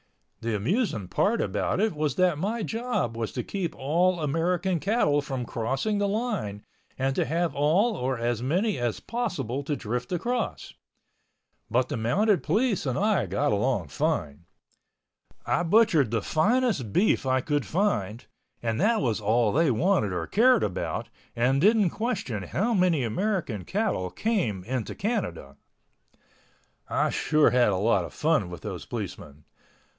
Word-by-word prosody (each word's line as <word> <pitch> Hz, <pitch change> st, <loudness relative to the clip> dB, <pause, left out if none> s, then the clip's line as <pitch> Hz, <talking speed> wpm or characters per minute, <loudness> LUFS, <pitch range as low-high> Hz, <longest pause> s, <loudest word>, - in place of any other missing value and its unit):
The 115 Hz, -1 st, -2 dB
amusing 115 Hz, -, -1 dB
part 225 Hz, +3 st, +1 dB
about -, -, -1 dB
it 220 Hz, 0 st, +2 dB
was 150 Hz, -1 st, -1 dB
that 180 Hz, -5 st, +2 dB
my 215 Hz, +5 st, -1 dB
job 225 Hz, -, -2 dB
was 115 Hz, -1 st, -3 dB
to -, -, -3 dB
keep 190 Hz, -5 st, -4 dB
all 175 Hz, +6 st, +1 dB
American 170 Hz, +4 st, 0 dB
cattle 155 Hz, -7 st, +2 dB
from 135 Hz, -3 st, -4 dB
crossing 135 Hz, -, -1 dB
the 205 Hz, -, +1 dB
line 200 Hz, -, -3 dB, 0.3 s
and 135 Hz, +1 st, 0 dB
to -, -, +2 dB
have 165 Hz, +4 st, 0 dB
all 180 Hz, +11 st, +2 dB
or 130 Hz, -4 st, -2 dB
as 120 Hz, 0 st, -1 dB
many 185 Hz, -, 0 dB
as 120 Hz, -3 st, -1 dB
possible 175 Hz, -, -3 dB
to 145 Hz, +1 st, -2 dB
drift 120 Hz, 0 st, -4 dB
across. 180 Hz, -, -2 dB, 1.0 s
But 125 Hz, +3 st, +2 dB
the -, -, -2 dB
Mounted 190 Hz, -, +2 dB
Police 205 Hz, -, 0 dB
and 130 Hz, -, -1 dB
I 205 Hz, -, +1 dB
got 100 Hz, +4 st, 0 dB
along 105 Hz, -, 0 dB
fine. 70 Hz, +3 st, -2 dB, 1.0 s
I -, -, +1 dB
butchered 170 Hz, -, +4 dB
the 115 Hz, -2 st, -1 dB
finest 205 Hz, -, +1 dB
beef 185 Hz, -, +2 dB
I 130 Hz, 0 st, +2 dB
could 145 Hz, 0 st, 0 dB
find 125 Hz, -, -1 dB, 0.4 s
and 115 Hz, +4 st, -1 dB
that 220 Hz, +3 st, +3 dB
was 115 Hz, -4 st, 0 dB
all 110 Hz, +1 st, +2 dB
they 160 Hz, +4 st, +3 dB
wanted 130 Hz, -, +2 dB
or 90 Hz, -2 st, -2 dB
cared 245 Hz, -, +4 dB
about 95 Hz, -, -3 dB, 0.3 s
and 130 Hz, +4 st, +2 dB
didn't 210 Hz, -2 st, +4 dB
question 215 Hz, -, -3 dB
how 200 Hz, -, -1 dB
many 180 Hz, -, +2 dB
American 135 Hz, -, -2 dB
cattle 190 Hz, -, -1 dB
came 170 Hz, -, -1 dB
into 120 Hz, +1 st, -3 dB
Canada. 130 Hz, -, -3 dB, 1.3 s
I -, -, +1 dB
sure 155 Hz, -1 st, +3 dB
had 125 Hz, -3 st, +4 dB
a 100 Hz, -, +1 dB
lot 100 Hz, 0 st, +2 dB
of -, -, -10 dB
fun 155 Hz, -, +1 dB
with 90 Hz, -3 st, -8 dB
those -, -, -6 dB
policemen. 75 Hz, +1 st, -7 dB
145 Hz, 155 wpm, -26 LUFS, -, 1.3 s, butchered